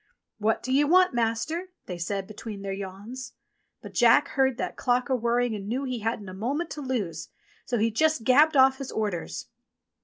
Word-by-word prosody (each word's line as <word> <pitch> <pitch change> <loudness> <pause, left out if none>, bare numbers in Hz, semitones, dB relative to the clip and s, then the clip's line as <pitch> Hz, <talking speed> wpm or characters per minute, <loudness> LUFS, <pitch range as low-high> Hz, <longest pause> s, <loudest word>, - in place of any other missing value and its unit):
"What 220 +1 +1
do 260 - -1
you 290 +2 +4
want. 365 +1 +5
Master?" 240 +10 -1 0.2
they 180 -2 -6
said 195 +3 -2
between 210 0 -8
their 195 -1 -3
yawns. 200 +7 -7 0.5
But - - -9
Jack - - +5
heard 265 -3 +1
that - - -3
clock 250 +2 0
a - - +4
whirring 240 0 +1
and 200 -2 -5
knew 250 +5 -1
he 255 -3 -3
hadn't 220 -2 -3
a 185 - -7
moment 275 - -2
to 300 - -5
lose, 200 - -3 0.4
so 245 - -1
he 225 +1 +2
just 310 +2 +2
gabbled 290 +5 +5
off 265 0 +5
his 275 - -5
orders. 175 - -3
235 Hz, 190 wpm, -27 LUFS, 205-265 Hz, 0.5 s, want